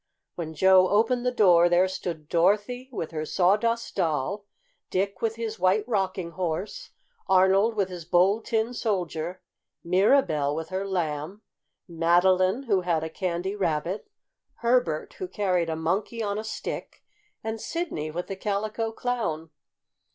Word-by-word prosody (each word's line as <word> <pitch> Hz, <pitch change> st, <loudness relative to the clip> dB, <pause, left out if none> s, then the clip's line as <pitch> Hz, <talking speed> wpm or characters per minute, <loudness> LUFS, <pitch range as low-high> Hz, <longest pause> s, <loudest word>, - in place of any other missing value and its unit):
When 160 Hz, -2 st, -6 dB
Joe 190 Hz, +2 st, +5 dB
opened 240 Hz, +4 st, +2 dB
the -, -, +2 dB
door 175 Hz, -7 st, +5 dB
there 175 Hz, +2 st, +4 dB
stood 170 Hz, -4 st, -5 dB
Dorothy 205 Hz, +10 st, +1 dB
with 165 Hz, -10 st, -4 dB
her 155 Hz, -1 st, -3 dB
Sawdust 210 Hz, +8 st, +1 dB
Doll, 175 Hz, +4 st, -1 dB, 0.4 s
Dick 195 Hz, 0 st, -1 dB
with 225 Hz, -1 st, 0 dB
his 225 Hz, -2 st, -5 dB
White 190 Hz, +4 st, +2 dB
Rocking 190 Hz, -6 st, -1 dB
Horse, 185 Hz, -, -4 dB, 0.4 s
Arnold 190 Hz, +4 st, +4 dB
with 200 Hz, -3 st, 0 dB
his 180 Hz, -2 st, -7 dB
Bold 185 Hz, +6 st, +3 dB
Tin 225 Hz, +1 st, 0 dB
Soldier, 180 Hz, -6 st, -3 dB, 0.4 s
Mirabell 170 Hz, -, +3 dB
with 160 Hz, 0 st, -5 dB
her 190 Hz, +1 st, -3 dB
Lamb, 175 Hz, +2 st, -3 dB, 0.4 s
Madeline, 185 Hz, +6 st, +3 dB
who 200 Hz, -7 st, +1 dB
had 170 Hz, -3 st, 0 dB
a 160 Hz, -, -5 dB
Candy 185 Hz, +2 st, -2 dB
Rabbit, 180 Hz, -, -2 dB, 0.5 s
Herbert, 235 Hz, -10 st, 0 dB
who 375 Hz, -, -3 dB
carried 185 Hz, -, 0 dB
a 160 Hz, -, -1 dB
Monkey 190 Hz, +8 st, -1 dB
on 205 Hz, 0 st, -2 dB
a -, -, -4 dB
Stick, 220 Hz, -, -6 dB, 0.4 s
and 220 Hz, 0 st, -4 dB
Sidney 330 Hz, -, -3 dB
with 175 Hz, +3 st, -4 dB
the 195 Hz, -, -5 dB
Calico 215 Hz, +3 st, -2 dB
Clown. 220 Hz, -11 st, -3 dB
190 Hz, 145 wpm, -26 LUFS, 170-215 Hz, 0.5 s, Joe